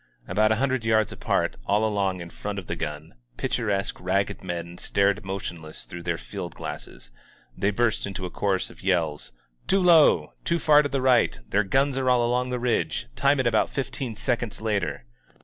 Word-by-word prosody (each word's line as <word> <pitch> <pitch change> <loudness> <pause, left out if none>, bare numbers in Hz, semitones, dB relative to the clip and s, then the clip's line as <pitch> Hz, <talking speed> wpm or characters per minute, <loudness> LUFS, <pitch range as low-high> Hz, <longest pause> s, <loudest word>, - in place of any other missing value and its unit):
About 110 +1 +3
a - - +4
himdred 130 0 0
yards 110 -2 +2
apart, - - -1
all 105 +2 +3
along 100 -4 0
in 85 0 -8
front 105 -1 -5
of 95 - -5
the 85 - -3
gun, 75 -1 -5 0.2
picturesque 105 -5 -1
ragged 100 +3 -1
men 85 -1 -5
stared 100 +1 +1
motionless 90 -5 -6
through 85 - -8
their - - -2
field - - -7
glasses. - - -8 0.4
They 100 - +1
burst 110 0 0
into 95 -1 -5
a 90 - -6
chorus 95 -2 -1
of - - -16
yells, 85 -6 0 0.4
^^Too 190 -1 +3
low! 165 -4 +5
Too 170 - +1
far 150 -2 +6
to 145 - -2
the 135 -2 -1
right! 130 -2 +4
Their 105 +2 +2
guns 135 +6 +1
are 130 -1 +1
all 125 -1 +4
along 125 +1 0
the 125 - -1
ridge! 120 -1 -1
Time 140 +3 +3
it 130 - +1
about 115 -2 +2
fifteen 130 -3 -4
seconds 120 -1 -2
later!" 105 - -2
105 Hz, 185 wpm, -25 LUFS, 95-125 Hz, 0.4 s, far